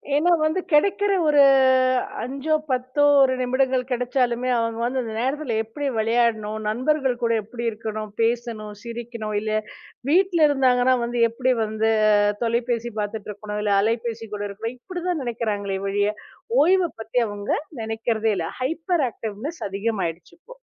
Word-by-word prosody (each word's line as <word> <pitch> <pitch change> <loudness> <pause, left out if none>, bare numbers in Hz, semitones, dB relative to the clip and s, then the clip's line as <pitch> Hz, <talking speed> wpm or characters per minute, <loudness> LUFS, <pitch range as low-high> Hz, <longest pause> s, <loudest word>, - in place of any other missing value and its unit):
ஏன்னா, 330 +5 +3
வந்து 310 +4 +1
கெடைக்கற 400 +6 +3
ஒரு 295 -1 +5 0.8
5ஓ 275 +5 -2 0.2
10ஓ 255 +3 0 0.2
ஒரு 265 -1 +4
நிமிடங்கள் 260 0 +1
கெடைச்சாலுமே 250 0 0
அவுங்க 230 0 -1
அந்த 260 +1 -1 0.2
நேரத்துல 265 0 -1
எப்பிடி 280 +6 -5
வெளையாடணும்? 220 -1 +1
நண்பர்கள் 255 +2 0
கூட 230 0 +2
எப்பிடி 235 +3 -7
இருக்கணும், 215 -1 -5
பேசணும், 230 -2 -1
சிரிக்கணும் 235 -2 -5
இல்லயா, 215 0 -1 0.5
வீட்டுல 350 -1 +4
இருந்தாங்கன்னா 260 -2 +3
வந்து 240 +1 -3
எப்பிடி 255 +3 +1
வந்து 220 +1 0 0.5
தொலைபேசி 235 0 -1
பாத்துட்டு 210 0 -4
இருக்கணும், 210 0 -6
இல்ல 205 -1 +2
அலைபேசி 225 +1 -2
கூட 205 - -6
இருக்கணும். 225 +4 -5
இப்பிடி 355 +5 -7
தான் 340 -5 -1
நெனைக்கிறாங்களே 210 -5 -2
ஒழிய, 205 +1 +1 0.5
ஓய்வ 365 +2 +4
பத்தி 225 +3 -1
அவங்க 205 -1 -5 0.3
நெனைக்கறதே 225 0 -1
இல்ல. 165 -2 -2
ஹைபர் 325 +4 0
ஆக்டிவ்னஸ் 225 +10 -6
அதிகம் 200 +1 -2
ஆயிடுச்சு. 165 0 -6
இப்போ. - - -15
235 Hz, 135 wpm, -23 LUFS, 215-265 Hz, 0.8 s, ஒரு